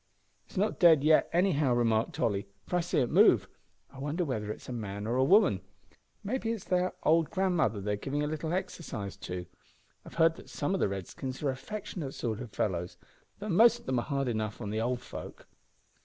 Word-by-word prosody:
"It's -, -, -13 dB
not 205 Hz, +3 st, 0 dB
dead 160 Hz, -6 st, +6 dB
yet 155 Hz, +1 st, +4 dB
anyhow," 155 Hz, -8 st, +2 dB
remarked 115 Hz, -2 st, +1 dB
Tolly, 100 Hz, -3 st, 0 dB, 0.2 s
"for 180 Hz, -, 0 dB
I -, -, +3 dB
see 175 Hz, 0 st, -1 dB
it 125 Hz, -, -1 dB
move. -, -, +5 dB, 0.4 s
I 135 Hz, -, -12 dB
wonder 150 Hz, +6 st, -1 dB
whether 105 Hz, -7 st, -3 dB
it -, -, -4 dB
is -, -, -14 dB
a 125 Hz, -, -5 dB
man 105 Hz, -3 st, -5 dB
or 115 Hz, +2 st, -1 dB
a 130 Hz, -, +3 dB
woman. 175 Hz, -, +4 dB, 0.6 s
Mayhap 225 Hz, +3 st, -2 dB
it's 225 Hz, -4 st, -2 dB
their 180 Hz, 0 st, 0 dB
old 160 Hz, 0 st, +3 dB
grandmother 180 Hz, -, +1 dB
they're 105 Hz, +1 st, -1 dB
giving 140 Hz, +7 st, -2 dB
a -, -, 0 dB
little 155 Hz, +1 st, -3 dB
exercise 170 Hz, -, -4 dB
to. 90 Hz, 0 st, -5 dB, 0.6 s
I've -, -, -12 dB
heard 165 Hz, 0 st, +4 dB
that -, -, -13 dB
some 190 Hz, -, -2 dB
o' 195 Hz, -, 0 dB
the -, -, +2 dB
Redskins 130 Hz, +8 st, -5 dB
are 140 Hz, -, +2 dB
affectionate 175 Hz, -1 st, -6 dB
sort 115 Hz, -2 st, -3 dB
o' 125 Hz, -, -5 dB
fellows, 90 Hz, -4 st, -2 dB, 0.4 s
though 210 Hz, +1 st, -6 dB
most 230 Hz, +6 st, +5 dB
of -, -, -22 dB
'em 130 Hz, -2 st, +2 dB
are -, -, -3 dB
hard 140 Hz, -2 st, -1 dB
enough 110 Hz, -2 st, -2 dB
on 105 Hz, -3 st, -4 dB
the 110 Hz, +1 st, -1 dB
old 125 Hz, +1 st, -1 dB
folk." -, -, -9 dB
140 Hz, 210 wpm, -30 LUFS, 110-180 Hz, 0.6 s, dead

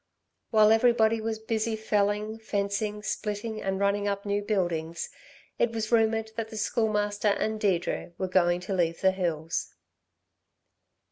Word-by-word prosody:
While 215 Hz, -1 st, +5 dB
everybody 225 Hz, -1 st, +4 dB
was 220 Hz, 0 st, -2 dB
busy, 220 Hz, 0 st, -1 dB
felling, 210 Hz, 0 st, 0 dB
fencing, 210 Hz, 0 st, -2 dB
splitting, 210 Hz, +2 st, -3 dB
and 195 Hz, 0 st, -1 dB
running 200 Hz, +1 st, +1 dB
up 200 Hz, 0 st, -2 dB
new 205 Hz, 0 st, 0 dB
buildings, 175 Hz, -6 st, -2 dB, 0.5 s
it 230 Hz, -, +2 dB
was 220 Hz, 0 st, -3 dB
rumoured 225 Hz, -1 st, +2 dB
that 225 Hz, -1 st, -3 dB
the 220 Hz, -, -8 dB
Schoolmaster 210 Hz, -1 st, 0 dB
and 215 Hz, +1 st, +1 dB
Deirdre 175 Hz, -3 st, 0 dB
were 190 Hz, -, -1 dB
going 175 Hz, -1 st, +2 dB
to 185 Hz, +2 st, -4 dB
leave 170 Hz, -3 st, 0 dB
the 190 Hz, -, +5 dB
hills. 165 Hz, -4 st, -2 dB
210 Hz, 140 wpm, -28 LUFS, 190-220 Hz, 0.5 s, While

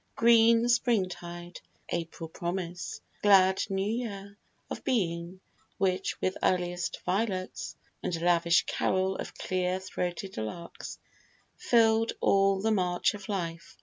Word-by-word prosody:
Green 230 Hz, 0 st, +5 dB
springtide, 185 Hz, -7 st, -1 dB, 0.3 s
April 165 Hz, 0 st, -4 dB
promise, 175 Hz, +1 st, -4 dB, 0.2 s
glad 190 Hz, -2 st, +5 dB
new 195 Hz, 0 st, 0 dB
year 205 Hz, -3 st, -4 dB, 0.3 s
Of -, -, -6 dB
Being, 175 Hz, -5 st, -1 dB, 0.4 s
which 190 Hz, -1 st, 0 dB
with 185 Hz, -, 0 dB
earliest 175 Hz, -1 st, 0 dB
violets, 185 Hz, 0 st, -2 dB, 0.3 s
And 170 Hz, -2 st, -2 dB
lavish 170 Hz, 0 st, +4 dB
carol 190 Hz, 0 st, 0 dB
of -, -, -6 dB
clear 185 Hz, 0 st, -1 dB
throated 185 Hz, 0 st, -4 dB
larks, 140 Hz, +11 st, -6 dB, 0.6 s
Fill'd 225 Hz, -1 st, +3 dB
all 195 Hz, 0 st, +3 dB
the 220 Hz, +2 st, +1 dB
march 180 Hz, -4 st, +1 dB
of 205 Hz, -1 st, -9 dB
life. 170 Hz, -4 st, -4 dB
185 Hz, 115 wpm, -29 LUFS, 175-205 Hz, 0.6 s, Green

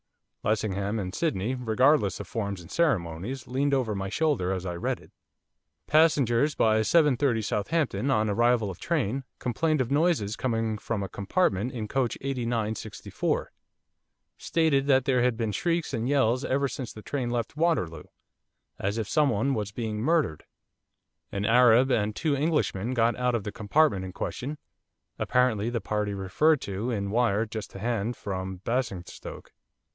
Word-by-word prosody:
Lessingham 105 Hz, -1 st, 0 dB
and 95 Hz, -3 st, -4 dB
Sydney, 125 Hz, -, -1 dB
regardless 125 Hz, -, +2 dB
of -, -, -7 dB
forms 100 Hz, -4 st, -3 dB
and 85 Hz, -, -13 dB
ceremonies, 115 Hz, -, -1 dB
leaned 140 Hz, +2 st, +1 dB
over 125 Hz, -5 st, 0 dB
my 95 Hz, -1 st, -3 dB
shoulder 130 Hz, -, +1 dB
as 95 Hz, -1 st, -3 dB
I 90 Hz, -, -3 dB
read 85 Hz, -, -2 dB
it. -, -, -18 dB, 0.7 s
'Passengers 150 Hz, -3 st, +3 dB
by 110 Hz, -1 st, +3 dB
7.30 135 Hz, -3 st, +3 dB
Southampton, 135 Hz, +6 st, 0 dB
on 110 Hz, -5 st, +2 dB
arrival 115 Hz, 0 st, +2 dB
of 90 Hz, -, -11 dB
train, 135 Hz, -, -1 dB
complained 155 Hz, +5 st, 0 dB
of 125 Hz, -, -2 dB
noises 145 Hz, -, +2 dB
coming 115 Hz, -4 st, -1 dB
from 105 Hz, -2 st, -3 dB
a -, -, -3 dB
compartment 100 Hz, -, 0 dB
in 115 Hz, -4 st, -4 dB
coach 130 Hz, 0 st, -1 dB
8964. 115 Hz, -5 st, -2 dB, 0.9 s
Stated 150 Hz, -4 st, +1 dB
that 135 Hz, -2 st, +4 dB
there 130 Hz, -2 st, +2 dB
had 125 Hz, -2 st, +2 dB
been 115 Hz, -2 st, -1 dB
shrieks 165 Hz, -, -1 dB
and 115 Hz, +1 st, -1 dB
yells 130 Hz, -2 st, +2 dB
ever 140 Hz, +1 st, +1 dB
since 130 Hz, -2 st, -6 dB
the 110 Hz, -, -11 dB
train 130 Hz, -4 st, -2 dB
left 120 Hz, 0 st, -2 dB
Waterloo, 150 Hz, -, 0 dB, 0.7 s
as 100 Hz, +3 st, -1 dB
if 110 Hz, -3 st, -2 dB
someone 135 Hz, -3 st, +2 dB
was 105 Hz, -4 st, -2 dB
being 110 Hz, -1 st, -3 dB
murdered. 150 Hz, -, +1 dB, 0.9 s
An 100 Hz, +1 st, -2 dB
Arab 125 Hz, +2 st, +5 dB
and 105 Hz, -3 st, +1 dB
two 150 Hz, -3 st, 0 dB
Englishmen 135 Hz, -, 0 dB
got 115 Hz, 0 st, +3 dB
out 125 Hz, -1 st, +1 dB
of 115 Hz, -, -2 dB
the 105 Hz, -, -4 dB
compartment 110 Hz, -1 st, +2 dB
in 95 Hz, -1 st, -7 dB
question, 140 Hz, +9 st, -4 dB, 0.6 s
apparently 120 Hz, -4 st, +2 dB
the 120 Hz, -1 st, -1 dB
party 105 Hz, -1 st, -2 dB
referred 130 Hz, +11 st, +2 dB
to 100 Hz, +5 st, -3 dB
in 100 Hz, -4 st, -2 dB
wire 115 Hz, -2 st, +2 dB
just 110 Hz, -1 st, -6 dB
to 95 Hz, -, -10 dB
hand 115 Hz, +1 st, -1 dB
from 95 Hz, -2 st, -5 dB
Basingstoke. 115 Hz, -7 st, -4 dB
115 Hz, 155 wpm, -27 LUFS, 105-135 Hz, 0.9 s, Arab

